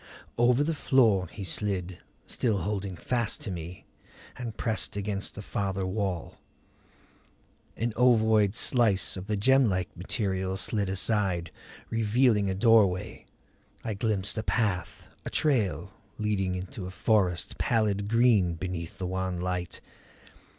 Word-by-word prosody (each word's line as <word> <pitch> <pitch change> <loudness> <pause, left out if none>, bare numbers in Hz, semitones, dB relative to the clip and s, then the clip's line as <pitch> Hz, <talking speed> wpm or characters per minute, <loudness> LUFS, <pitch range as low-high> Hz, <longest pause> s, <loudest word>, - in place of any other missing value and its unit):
Over 120 +3 +4
the 165 +2 0
floor 115 -10 +3
he 100 - -7
slid, 95 -1 -1 0.3
still 110 -5 0
holding 100 0 -3
fast 120 +2 -1
to 100 - -4
me, 85 0 -7 0.5
and 115 -3 -6
pressed 110 -3 -1
against 100 -1 -3
the 105 - -7
farther 95 -1 -2
wall. 95 -3 -3 1.4
An 115 0 -1
ovoid 110 -4 +4
slice 115 -7 +2
of 95 +1 -7
the 105 -1 -1
gemlike 105 -5 +2
material 95 0 -2
slid 100 0 -1
aside, 95 -3 0 0.4
revealing 115 -2 +2
a 95 - -1
doorway. 105 -4 +3 0.6
I 110 - -2
glimpsed 105 0 -1
a - - -3
path, 105 -6 -1 0.2
a - - -5
trail, 125 - 0 0.2
leading 100 -3 -1
into 90 +1 -6
a - - -5
forest 95 -2 0
pallid 105 -3 +1
green 110 -6 +3
beneath 90 +1 -5
the 90 - -4
wan 95 -1 -2
light. 90 -1 -3
100 Hz, 130 wpm, -28 LUFS, 95-110 Hz, 1.4 s, Over